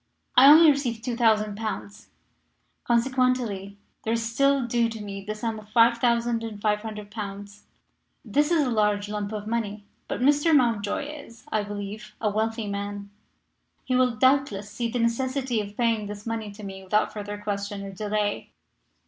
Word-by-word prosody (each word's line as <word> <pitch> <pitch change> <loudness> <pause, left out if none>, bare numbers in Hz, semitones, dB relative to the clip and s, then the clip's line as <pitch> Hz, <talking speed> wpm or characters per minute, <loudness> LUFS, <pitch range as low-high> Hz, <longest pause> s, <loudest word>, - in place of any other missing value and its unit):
I 260 +2 +9
only 315 +1 +9
received 245 -6 -2
2,000 220 -4 +2
pounds, 215 -1 -6 0.8
consequently 235 -5 0 0.2
there 225 - -1
is 230 0 -1
still 275 0 +3
due 235 -1 +1
to 225 -1 -7
me 200 -1 -6
the 215 +2 -4
sum 220 0 -3
of 210 0 -15
5,500 225 -3 +1
pounds. 205 -1 -7 0.6
This 295 +2 +2
is 325 -4 +3
a 250 - -1
large 210 -2 +1
lump 210 -1 -3
of 210 -1 -5
money. 215 -2 -3 0.2
But - - -3
Mr. 290 +4 +4
Mountjoy 230 -4 +1
is, 280 -5 -10
I 215 - +1
believe, 205 +1 -7
a 210 -2 0
wealthy 220 +1 -1
man. 200 0 -5 0.7
He 255 - -1
will, 250 -2 +3
doubtless, 220 -5 +2
see 230 +2 -2
the 245 - -2
necessity 250 +1 0
of 205 0 -9
paying 230 -3 +1
this 205 0 -8
money 225 -2 -3
to 210 +1 -11
me 190 -1 -7
without 210 +3 +1
further 205 -1 -5
question 200 -1 -4
or 195 - -6
delay. 205 +1 -2
220 Hz, 155 wpm, -26 LUFS, 205-240 Hz, 0.8 s, I